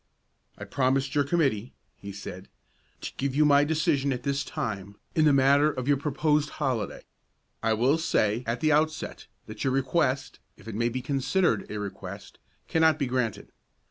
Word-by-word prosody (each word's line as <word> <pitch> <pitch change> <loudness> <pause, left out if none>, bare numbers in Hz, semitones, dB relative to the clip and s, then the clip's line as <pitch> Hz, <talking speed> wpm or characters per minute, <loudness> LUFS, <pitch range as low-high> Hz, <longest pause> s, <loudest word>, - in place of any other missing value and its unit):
"I - - -8
promised 135 +1 0
your 145 -1 +3
committee," 135 -8 0 0.2
he 100 - -9
said, 95 -1 -9 0.5
"to - - -5
give 135 -1 -2
you 150 +1 +4
my 145 -1 +5
decision 145 -2 +1
at 125 -1 -3
this 140 0 0
time 100 -10 -5 0.2
in 155 - +3
the 150 - +6
matter 140 +2 +4
of 130 -2 -5
your 145 -1 +4
proposed 150 +1 +1
holiday. 130 -8 -2 0.6
I 115 - +2
will 130 +8 +2
say 110 -7 +1
at 115 +2 -2
the 155 -1 +3
outset, 155 +1 0 0.2
that 110 0 -7
your 135 -2 +1
request, 135 0 0 0.2
if - - -16
it 115 - -5
may 115 +3 0
be 125 +1 -4
considered 135 - 0
a 105 - -4
request, 100 -1 -8 0.3
cannot 160 -2 +3
be 145 - 0
granted. 125 -4 -2
135 Hz, 175 wpm, -27 LUFS, 115-150 Hz, 0.6 s, the